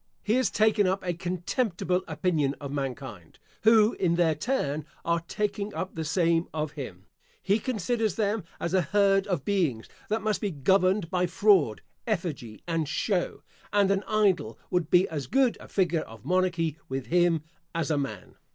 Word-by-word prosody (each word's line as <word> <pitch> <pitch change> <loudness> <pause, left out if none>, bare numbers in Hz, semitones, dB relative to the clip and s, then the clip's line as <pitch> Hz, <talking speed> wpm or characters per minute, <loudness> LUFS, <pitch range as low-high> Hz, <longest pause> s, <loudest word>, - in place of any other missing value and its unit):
He 215 - +1
has 255 +1 +3
taken 215 -2 +3
up 190 +1 -1
a 175 - 0
contemptible 180 +1 -1
opinion 155 -3 0
of 140 -2 -6
mankind, 130 - -5 0.2
who, 220 0 +5
in 170 -3 +1
their 170 -2 +3
turn, 155 - -1 0.2
are 170 0 +2
taking 210 -1 -2
up 185 - -4
the 160 - -3
same 165 +1 +2
of 155 -1 -2
him. 105 - -8 0.4
He 200 +3 +2
considers 220 -2 -1
them 210 -1 0 0.2
as 170 - -2
a 190 - +4
herd 195 +3 +2
of 180 -8 -2
beings 165 - 0 0.2
that 220 +1 0
must 215 -2 0
be 205 - 0
governed 185 +4 +2
by 180 -1 +1
fraud, 180 - +3 0.3
effigy, 155 - -3
and 165 -3 -1
show; 180 +5 -1 0.3
and 200 -1 +3
an 195 0 +2
idol 195 - +1
would 180 -3 0
be 180 +1 +5
as 145 -5 -4
good 260 - +3
a - - -12
figure 175 -4 +1
of 110 -6 -12
monarchy 175 -4 0
with 130 -1 -3
him, 175 -2 +2 0.3
as 165 -1 -1
a 150 - +2
man. 135 -1 -6
180 Hz, 170 wpm, -27 LUFS, 155-200 Hz, 0.4 s, who